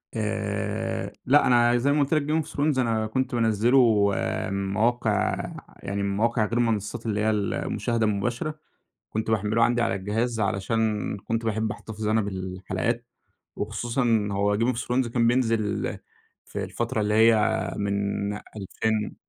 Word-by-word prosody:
آآ 110 -1 -2
لأ، 145 +3 +5
أنا 120 -1 +4
زي 140 +4 +2
ما 145 - +2
قُلت 140 +2 +1
لك 155 - +3
Game 155 +1 +1
of - - -13
Thrones 145 -2 +1
أنا 115 -3 +1
كنت 130 +3 -1
بانزله 115 -2 +4 0.4
من 100 0 -2
مواقع 110 -1 +1 0.5
يعني 100 0 -2
من 100 0 -1
مواقع 115 0 +2
غير 115 +3 -2
المنصات 115 -1 -1
اللي 105 -2 -1
هي 110 - +2
المشاهدة 110 +2 -1
المباشرة، 120 +9 -2 0.5
كنت 110 +1 -2
باحمّله 110 +2 +2
عندي 120 +1 +2
على 115 - +1
الجهاز، 110 +4 -1
علشان 105 +1 0
كنت 115 +3 -3
باحب 110 0 0
أحتفظ 110 -1 -6
أنا 110 +1 +3
بالحلقات، 95 +4 -3 0.5
وخصوصًا 115 +1 0
هو 100 +1 +1
Game 120 +3 +2
of 115 - -7
Thrones 125 0 0
كان 115 0 +1
بينزل 120 -2 +3 0.9
في - - -5
الفترة 115 -1 -2
اللي 105 0 0
هي 110 +1 +6 0.4
من 100 0 -1
ألفين 105 +1 -3
110 Hz, 150 wpm, -25 LUFS, 105-120 Hz, 0.9 s, هي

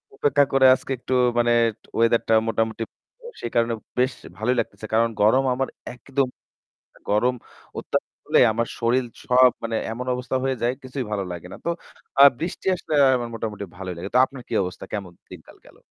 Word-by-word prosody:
অপেক্ষা 145 +1 +3
করে 135 -1 +5
আজকে 135 - -9
একটু 125 - -4 0.3
মানে 120 0 +3 0.5
ওয়েদারটা 115 0 +3
মোটামুটি। 115 0 -1 0.6
সে - - -5
কারণে 115 0 +2 0.3
বেশ 130 0 +2 0.2
ভালোই 115 +5 +1
লাগতেছে। 110 - -4
কারণ 115 +1 +3
গরম 115 +6 +5
আমার 135 +1 -1 0.2
একদম 135 +2 -1 0.5
গরম, - - -28
গরম 120 +5 +2 0.4
অত্যাধিক - - -3
হলে - - +4
আমার 115 +1 -1
শরীর 125 +2 +2 0.2
সব, 125 0 +6
মানে, 115 0 -2 0.2
এমন 120 +3 -5
অবস্থা 125 +1 -4
হয়ে 135 0 0
যায়, 120 +1 +1
কিছুই 130 0 -4
ভালো 100 -2 -1
লাগে 90 0 -7
না। - - -9
তো - - 0 0.5
আ - - +11 0.2
বৃষ্টি 175 +3 -5
আসলে 170 -3 -6 0.2
আমার 120 -1 -3
মোটামুটি 105 -2 -4
ভালোই 95 -1 -5
লাগে। 90 +4 -6
তো - - +7
আপনার 130 -1 -11
কী - - -7
অবস্থা? 90 +1 -6
কেমন 100 -4 -4 0.2
দিনকাল - - -13
গেল? - - -18
120 Hz, 175 wpm, -23 LUFS, 110-130 Hz, 0.6 s, আ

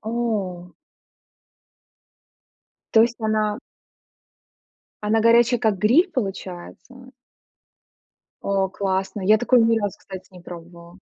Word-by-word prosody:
О. 210 -6 -4 2.2
То 220 - +6
есть 235 +1 +2
она 215 -1 -1 1.5
она 220 +2 +2
горячая, 235 +2 +4
как 215 -3 0
гриль 255 - +3
получается? 245 - -7 1.3
О, 195 -1 0
классно, 190 +1 -3
я 210 +3 +4
такое 245 +1 +3
ни 225 0 +3
разу, 205 -3 -4
кстати, 190 -1 -10
не 180 - -13
пробовала. 170 +1 -12
210 Hz, 95 wpm, -22 LUFS, 190-230 Hz, 2.2 s, То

